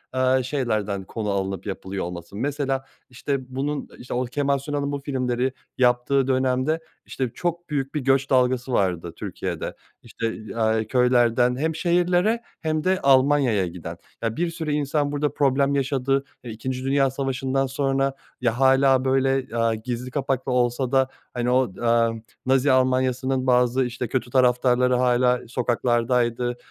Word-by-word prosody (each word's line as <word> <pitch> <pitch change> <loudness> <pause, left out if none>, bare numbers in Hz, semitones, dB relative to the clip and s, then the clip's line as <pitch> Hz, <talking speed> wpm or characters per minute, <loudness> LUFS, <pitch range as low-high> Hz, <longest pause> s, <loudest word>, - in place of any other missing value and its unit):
eee, 130 0 +3
şeylerden 110 -8 -1
konu 105 +2 -4
alınıp 95 -1 -2
yapılıyor 95 -1 -4
olması. 85 +1 -8
Mesela, 135 +2 -2 0.2
işte, 130 0 -4
bunun, 145 +2 -2
işte, 125 - -7
o 125 +1 0
Kemal 140 +3 0
Sunal'ın 145 +1 -3
bu 145 - -2
filmleri 130 -2 -1 0.3
yaptığı 125 +2 +2
dönemde, 130 +4 +1 0.3
işte, 130 -2 -3
çok 175 0 -3
büyük 140 -2 -2
bir 150 - +1
göç 135 +1 +2
dalgası 130 0 +2
vardı 90 -5 0
Türkiye'de. - - -5 0.3
İşte, 115 -1 -4 0.2
aaa, 110 -1 +1
köylerden 125 +1 +3
hem 160 +3 -1
şehirlere 180 +6 +2 0.2
hem 155 -1 -1
de 185 +2 +2
Almanya'ya 135 -7 +4
giden. 85 -1 -7 0.2
Ya, 115 -1 -2
bir 175 0 0
sürü 160 -2 -4
insan 145 0 0
burada 145 -1 -1
problem 140 0 +2
yaşadı. 135 0 0 0.2
E, 120 - -8
İkinci 130 +4 -4
Dünya 135 0 +2
Savaşı'ndan 135 0 -1
sonra 135 0 0 0.3
ya, 120 0 0
hâlâ 135 0 +4
böyle, 135 -2 +1
aaa, 115 -1 +2
gizli 125 +3 -5
kapaklı 135 -1 -1
olsa 125 +1 +1
da, 135 -1 +3 0.3
hani, 120 0 -1
o, 125 -5 +2
eee, 115 -1 +1 0.2
Nazi 130 +1 +3
Almanya'sının 130 0 +1
bazı, 125 +1 +3
işte, 125 0 -4
kötü 125 +1 -2
taraftarları 125 0 +3
hâlâ 125 0 +2
sokaklardaydı, 120 0 0
130 Hz, 145 wpm, -24 LUFS, 120-135 Hz, 0.3 s, Almanya'ya